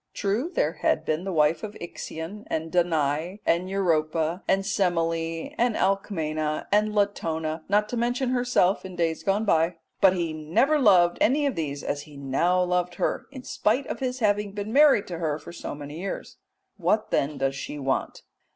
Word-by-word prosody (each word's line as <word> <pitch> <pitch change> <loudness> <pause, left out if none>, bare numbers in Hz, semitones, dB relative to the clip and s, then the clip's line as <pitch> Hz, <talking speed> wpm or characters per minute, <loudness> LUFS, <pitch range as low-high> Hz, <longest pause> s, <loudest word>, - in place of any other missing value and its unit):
True, 215 - -1
there - - +1
had - - +1
been 155 +4 -1
the 195 - -2
wife 155 -1 +2
of 210 -1 -7
Ixion 170 +3 -7
and 160 0 -3
Danae, 165 +1 0
and 175 +2 +1
Europa 165 -2 0
and 195 0 +2
Semele, 165 -4 -1
and 235 -1 +2
Alcmena, 155 -6 -1
and 210 +1 +2
Latona, 160 -6 -1
not 210 +1 +3
to 245 - -3
mention 245 +2 0
herself 245 -7 +2
in 185 -1 -8
days 165 -2 0
gone 200 +3 +1
by, 165 -2 +2 0.3
but 190 -2 +7
he 170 -3 -2
never 170 - +2
loved 180 -8 +5
any 290 +5 +3
of 280 - +1
these 145 -5 -4
as 145 - -2
he 145 -1 -13
now 170 +7 +1
loved 180 0 0
her, - - -1
in 265 -2 -10
spite 250 +5 0
of - - -5
his 255 -1 -2
having 205 -1 +1
been 205 +2 -4
married 285 -7 +6
to 175 -2 -6
her 155 -3 -1
for 170 - -11
so 170 - -6
many 145 +2 -8
years. 195 +2 -5 0.4
What 215 0 0
then 140 +1 0
does 135 0 0
she 140 +2 -6
want? 135 -2 -2
180 Hz, 180 wpm, -26 LUFS, 160-210 Hz, 0.4 s, but